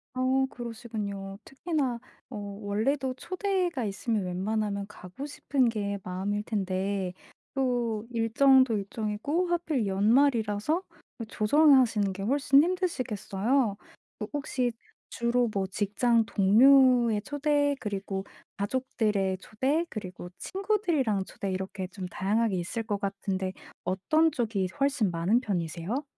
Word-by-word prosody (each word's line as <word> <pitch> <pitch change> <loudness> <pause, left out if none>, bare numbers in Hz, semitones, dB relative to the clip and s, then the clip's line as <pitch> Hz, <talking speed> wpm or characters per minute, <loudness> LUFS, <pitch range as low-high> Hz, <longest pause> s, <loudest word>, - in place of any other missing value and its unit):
어 260 +1 +2
그러시군요. 215 -5 -6
특히나 270 -4 -2 0.3
어 - - -6 0.3
원래도 255 +6 0
초대가 365 - -1
있으면 210 +1 -1
웬만하면 200 +2 -2
가고 205 +5 -9
싶은 275 -3 +1
게 200 -3 -2
마음일 195 +3 -2
텐데 195 -2 -2 0.4
또 240 -5 0
일정도 245 +2 +4
일정이고 215 - -2
하필 320 -9 0
연말이라서 220 - +2 0.4
그 230 - -4
조정하시는 235 -4 +4
게 195 +1 -6
훨씬 275 +4 +4
힘드시겠어요. 255 - 0 0.4
그 210 - -4
혹시 260 -4 -1 0.4
주로 240 +1 +1
뭐 195 -1 0
직장 210 +4 +1
동료의 235 +2 +5
초대, 290 0 +1
그리고 195 -2 -4 0.3
가족들의 205 -4 0
초대, 270 - 0
그리고 185 -4 -7
친구들이랑 345 - 0
초대 195 0 -5
이렇게 190 0 -4
좀 185 0 -7
다양하게 205 +3 0
있을 180 +6 -3
것 210 -2 -2
같은데 195 -2 -2 0.3
어떤 310 - +2
쪽이 220 -8 -1
서 185 - -14
훨씬 275 -7 +2
많은 175 +8 +2
편이세요? 185 - -2
225 Hz, 280 characters per minute, -28 LUFS, 200-270 Hz, 0.4 s, 동료의